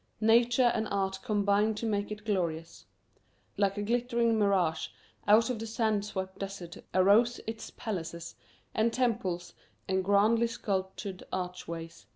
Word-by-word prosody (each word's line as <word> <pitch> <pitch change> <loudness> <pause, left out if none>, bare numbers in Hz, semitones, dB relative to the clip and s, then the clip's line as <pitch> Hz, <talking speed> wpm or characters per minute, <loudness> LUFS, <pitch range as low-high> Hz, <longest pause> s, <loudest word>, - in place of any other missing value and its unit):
Nature 240 +2 +4
and 220 -1 -1
art 195 -1 -1
combined 210 -1 +1
to 230 - -3
make 205 -2 -1
it 210 0 -7
glorious. 170 -5 -2 0.7
Like 200 0 +1
a 205 - -1
glittering 235 0 +1
mirage 190 -6 +2 0.4
out 225 +4 +5
of 235 - -4
the 225 - -5
sand 220 -2 0
swept 190 -2 -5
desert 195 -4 -6
arose 210 +6 +4
its 225 0 -6
palaces 170 -5 -5 0.4
and 225 +1 +2
temples 195 -8 -1 0.3
and 190 0 +1
grandly 210 +4 +4
sculptured 190 -3 -3
archways. 170 -2 -5
205 Hz, 135 wpm, -30 LUFS, 190-225 Hz, 0.7 s, out